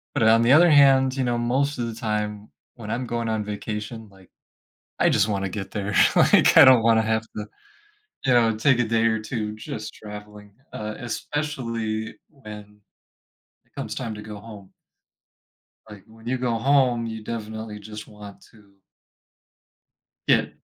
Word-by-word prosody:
But 110 - +2
on 115 +1 +5
the 120 - +4
other 170 +3 +6
hand, 135 -2 +5
you 130 - 0
know, 120 -1 0
most 135 +4 0
of 120 - -2
the 115 - -5
time 105 -2 -4 0.2
when 110 -3 -9
I'm 120 +2 -3
going 115 -1 -3
on 110 -1 -1
vacation, 105 +2 -6
like, 95 -1 -20 0.7
I - - +3
just 105 - +2
wanna 100 -2 -2
get 95 +1 -6
there, 105 -1 -4 0.2
like, - - +5
I - - +10
don't 130 -3 +6
wanna 115 -1 +4
have 110 0 0
to, 105 0 -5 0.8
you 130 - +2
know, 115 -2 +3
take 130 +2 +3
a 120 - +2
day 115 0 +1
or 110 -1 +1
2 110 -2 -4
just 110 0 -7
traveling, 105 -1 -11 0.2
uh, 105 0 -5
especially 115 -4 -4
when 105 -7 -12 0.9
it - - -38
comes - - -5
time 115 -4 -4
to 105 - -8
go 105 -1 -9
home. 100 -3 -13 1.2
Like, 105 -3 -12
when 110 +1 -18
you 130 +1 -1
go 125 -2 -1
home, 125 -2 +2
you 110 -1 -6
definitely 110 -1 -6
just 105 +1 -9
want 105 -1 -13
to 105 -3 -21 1.6
get - - +2
110 Hz, 165 wpm, -23 LUFS, 105-120 Hz, 1.6 s, I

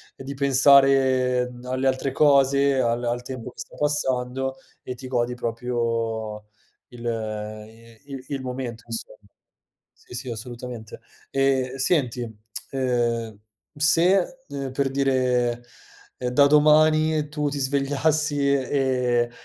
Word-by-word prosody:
di 135 +1 -7
pensare 135 -2 +4
alle 130 +1 -1
altre 130 +1 0
cose, 140 -1 +4
al 120 -1 0
al 120 0 -1
tempo 125 -1 -7
che - - -19
sta - - -9
passando, 130 -2 -1 0.3
e 125 - -6
ti 130 +1 -9
godi 125 -1 -1
proprio 115 -3 -3 0.4
il 120 -1 -11
ehm, 110 -1 -4
i 115 +5 -17
il 130 -1 -7
il 140 -2 -3
momento 125 -3 -5
insomma. 115 -2 -6 0.7
Sì, - - -17
sì, 125 +1 -5
assolutamente. 120 0 -8 0.3
E 135 -2 +1
senti, 125 -5 0 0.4
ehm, 120 -4 -1 0.4
se, 175 - +3
uhm, 140 -2 -5
per 135 0 0
dire, 125 -3 +1 0.5
ehm, 125 - -2
da 140 +3 +5
domani 155 +1 +4
tu 150 0 -2
ti 145 - -4
svegliassi 145 +1 +1
e - - +4 0.2
e 125 -3 +1
130 Hz, 125 wpm, -24 LUFS, 120-140 Hz, 0.7 s, da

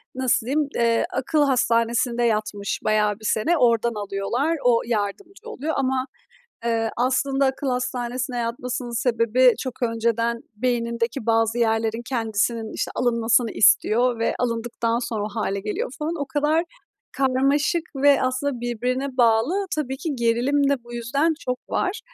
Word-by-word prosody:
nasıl 255 -3 +1
diyim, 295 +2 +1
eee, 230 -1 +2
akıl 280 +4 +1
hastanesinde 235 -2 +1
yatmış 215 -3 -1
bayağı 210 -1 +2
bir 215 - -11
sene. 220 +12 +1
Oradan 235 -2 +3
alıyorlar, 240 +12 -1
o 235 -2 +4
yardımcı 245 - -4
oluyor 320 - -3
ama, 260 -1 0 0.6
eee, 225 -1 0
aslında 270 +2 +1
akıl 265 +1 -2
hastanesine 250 0 -2
yatmasının 240 0 -3
sebebi 240 +1 +3
çok 255 -1 -6
önceden 230 0 0 0.2
beynindeki 235 0 -1
bazı 225 0 +2
yerlerin, 225 0 0
kendisinin, 225 -2 -1
işte, - - -2
alınmasını 235 -1 +2
istiyor. 235 +3 +3
Ve 230 - 0
alındıktan 230 -1 -1
sonra 230 -3 -3
o - - -3
hâle 200 -2 -2
geliyor 210 +4 -3
falan. 310 +2 -2
O 285 - -2
kadar 295 +4 +1 0.5
karmaşık 275 +4 +2
ve 280 +1 +4
aslında 255 0 -1
birbirine 250 +3 -2
bağlı, 245 - +2
tabii 265 -3 -2
ki 305 +1 -3
gerilim 250 +4 +1
de 265 -4 -1
bu 240 0 -10
yüzden 275 +8 0
çok 250 0 -3
var. 390 +1 -1
240 Hz, 140 wpm, -23 LUFS, 230-265 Hz, 0.6 s, o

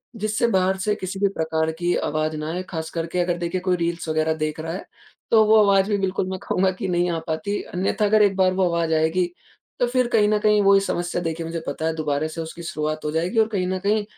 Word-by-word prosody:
जिससे 215 +2 0
बाहर 190 -2 +2
से 210 +2 0
किसी 190 -1 -5
भी 200 - +3
प्रकार 160 0 0
की 175 0 +1
आवाज़ 155 +1 -1
ना 155 0 -4
आए। 180 +1 -3
खासकर 165 0 -4
के 180 +2 -3
अगर, 175 0 0
देखिए, 175 +1 -2
कोई 185 -1 +1
रील्स 170 -1 -2
वगैरह 155 0 +1
देख 155 0 -3
रहा 165 +1 -4
है, 190 - -6 0.5
तो 220 -1 +6
वो 220 +1 +5
आवाज़ 195 0 +3
भी, 205 - +2
बिल्कुल, 190 -1 -1
मैं 190 -1 -4
कहूँगा 185 0 +1
कि 190 - -2
नहीं 175 0 +1
आ 165 - -1
पाती। 200 +6 -2
अन्यथा, 195 +3 0
अगर 215 +1 +4
एक 195 -2 +3
बार 185 -1 +3
वो 190 0 +2
आवाज़ 170 -1 0
आएगी, 160 +3 +2 0.5
तो 245 - +3
फिर 250 0 +1
कहीं 210 -2 +4
न 215 - +3
कहीं 210 -1 +4
वही 195 0 +6
समस्या, 175 -2 -2
देखिए, 165 -1 -3
मुझे 165 0 -4
पता 150 +3 -3
है, 160 - +1
दोबारा 150 -1 -1
से 165 +1 -6
उसकी 165 +1 -8
शुरुआत 155 -1 -3
हो 150 - -1
जाएगी 175 +8 0
और 220 - +4
कहीं 190 -5 -1
न 185 0 -1
कहीं 210 +1 +2
180 Hz, 250 wpm, -23 LUFS, 160-200 Hz, 0.5 s, तो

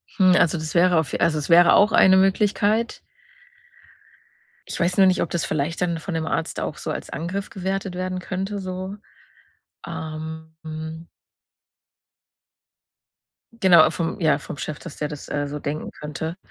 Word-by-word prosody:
Hm, 185 -3 +5
also, 170 +1 +3
das 155 0 -5
wäre 175 0 +4
auf 155 -4 -3
also, 165 -2 +2
es 150 - -4
wäre 170 +1 +7
auch 205 +2 +5
eine 190 -2 +6
Möglichkeit. 205 +4 +1 1.7
Ich - - -4
weiß 180 +1 +1
nur 195 -1 +7
nicht, 185 - +2
ob 170 - -1
das 170 - -1
vielleicht 155 +3 -2
dann 170 -2 0
von 165 +3 -6
dem 160 -1 -2
Arzt 165 0 -2
auch - - -4
so - - -4
als - - -6
Angriff 180 +6 -4
gewertet 190 0 -3
werden 185 0 -3
könnte 195 +3 -4
so, 185 +1 -5 0.9
ähm, 160 0 -7
mhm. 160 +1 -7 2.5
Genau, 175 -4 +7
vom 165 +4 -3
ja, 155 -5 +3
vom 145 - -8
Chef, 155 0 -5
dass 170 - -10
der 150 - -2
das, 150 -1 -9
äh, 145 0 -2
so 145 +1 -5
denken 150 +2 -4
könnte. 160 +3 -6
170 Hz, 160 wpm, -23 LUFS, 155-185 Hz, 2.5 s, wäre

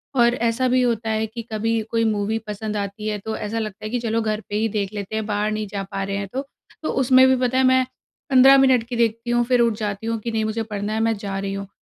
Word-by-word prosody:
और 240 -1 +4
ऐसा 235 +2 0
भी 255 0 +3
होता 230 -2 0
है 220 0 0
कि 230 +2 -7
कभी 225 +1 0
कोई 230 0 +1
मूवी 215 0 0
पसंद 210 0 -4
आती 200 +1 -4
है 210 -1 -1
तो 220 0 -2
ऐसा 215 +2 -3
लगता 215 -3 -6
है - - -3
कि 245 - 0
चलो 230 -1 -1
घर 215 -1 -1
पे 205 - -3
ही 220 +2 +1
देख 205 -1 -2
लेते 205 0 -5
हैं, 220 -1 -2
बाहर 210 0 -1
नहीं 215 0 -3
जा 200 0 -4
पा 195 - -2
रहे 200 0 -3
हैं 200 0 -3
तो, 265 - -1 0.4
तो - - -1
उसमें 260 0 +5
भी 260 - +4
पता 255 +1 0
है 265 - +4
मैं 260 0 +4 0.4
15 265 0 +7
मिनट 260 -3 +4
की 245 - -4
देखती 230 0 0
हूँ, 240 0 +3
फिर 250 0 +2
उठ 235 -1 +3
जाती 210 0 -3
हूँ 230 0 -1
कि 230 +2 -4
नहीं 220 -1 0
मुझे 220 +1 -2
पढ़ना 210 -1 -4
है 220 - -1
मैं 225 0 +2
जा 200 -1 -4
रही 195 0 -3
हूँ। 200 0 -5
220 Hz, 280 wpm, -22 LUFS, 210-240 Hz, 0.4 s, 15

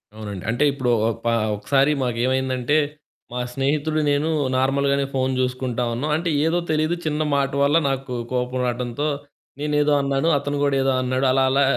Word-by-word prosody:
అవునండి. 105 -4 -7
అంటే 120 +6 +1
ఇప్పుడు 130 -3 -1 0.2
ఒపా 115 +1 -1 0.2
ఒకసారి 135 +7 +2
మాకేమైందంటే 130 +3 0 0.5
మా 125 - -3
స్నేహితుడు 150 +3 0
నేను 145 +3 +1 0.3
నార్మల్‌గానే 140 +1 +1
ఫోను 130 0 0
జూసుకుంటా 125 -1 -1
ఉన్నాం. 140 +6 -2
అంటే 170 +1 -2 0.2
ఏదో 170 +2 +2
తెలీదు 155 +2 +1
చిన్న 155 0 -1
మాట 140 -1 +1
వల్ల 145 +3 +4
నాకు 135 -1 -3 0.2
కోపం 125 0 -1
రాటంతో 120 +4 -2 0.5
నేనేదో 150 0 +1
అన్నాను. 140 +3 0
అతను 145 +1 -3
గూడా 140 -1 +2
ఏదో 135 - +2
అన్నాడు. 130 +1 0
అలా 135 0 +3
అలా 140 +1 +3
135 Hz, 155 wpm, -22 LUFS, 125-145 Hz, 0.5 s, వల్ల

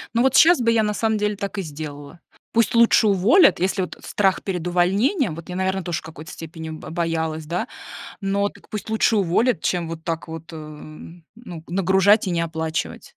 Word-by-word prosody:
Ну, 235 - +3
вот 265 -1 +3
сейчас 320 0 +6
бы 230 0 +3
я 225 -1 +3
на 210 0 0
самом 220 0 0
деле 210 0 -1
так 200 +1 -5
и - - 0
сделала. 150 0 -8 0.3
Пусть 230 +1 +2
лучше 230 -2 +5
уволят, 205 - +5
если 190 +1 0
вот 180 - -5
страх 195 -2 0
перед 180 -3 -3
увольнением, 190 - +1
вот 165 +2 -10
я, 180 - -4
наверное, 190 0 -1
тоже 175 -3 -2
в - - -15
какой-то 155 0 -10
степени 160 0 -8
бо 155 0 -8
боялась, 160 -2 -2
да, 180 +9 -3 0.5
но 200 +1 0
так - - -18
пусть 215 +1 -6
лучше 220 0 +2
уволят, 190 +2 +1
чем 175 -2 -1
вот 165 -1 -7
так 165 -1 -4
вот, 165 +1 -9
э, - - -7
ну, 160 +5 -11
нагружать 190 +3 +3
и - - -1
не 170 - 0
оплачивать. 160 -1 -3
180 Hz, 200 wpm, -22 LUFS, 160-210 Hz, 0.5 s, сейчас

